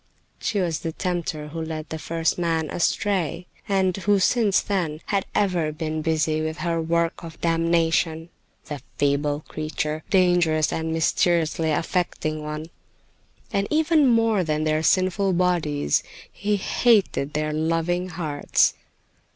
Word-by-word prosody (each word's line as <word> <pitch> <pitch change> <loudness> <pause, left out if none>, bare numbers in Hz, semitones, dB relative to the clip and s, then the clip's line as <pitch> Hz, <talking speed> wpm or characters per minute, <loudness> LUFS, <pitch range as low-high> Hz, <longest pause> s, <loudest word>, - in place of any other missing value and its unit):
She 205 - -1
was 170 -4 0
the 165 - -4
tempter 170 -5 -3
who 165 +2 -5
led 160 -1 -5
the 160 - -5
first 165 +2 -1
man 165 -2 0
astray, 180 -2 0 0.2
and 190 -2 +2
who 200 +1 +2
since 205 +1 +3
then 175 -7 -2
had 200 -2 -1
ever 180 -6 +1
been 155 0 -3
busy 155 0 +1
with 160 +1 -3
her 165 -1 -1
work 170 +1 0
of 165 -1 -9
damnation, 165 0 +1 0.4
the 145 -4 -6 0.2
feeble 145 +1 +1
creature, 155 0 -3
dangerous 175 -5 +3
and 160 0 -2
mysteriously 165 0 +1
affecting 155 -1 -1
one. 155 +2 -6 0.8
And 200 0 +1
even 310 -1 +3
more 225 -5 +3
than 155 -1 -1
their 155 0 +1
sinful 185 +3 +2
bodies, 170 - +1 0.3
he 205 0 -1
hated 195 - +2
their 155 0 -1
loving 165 +3 0
hearts. 160 -4 +1
165 Hz, 135 wpm, -24 LUFS, 155-185 Hz, 0.8 s, since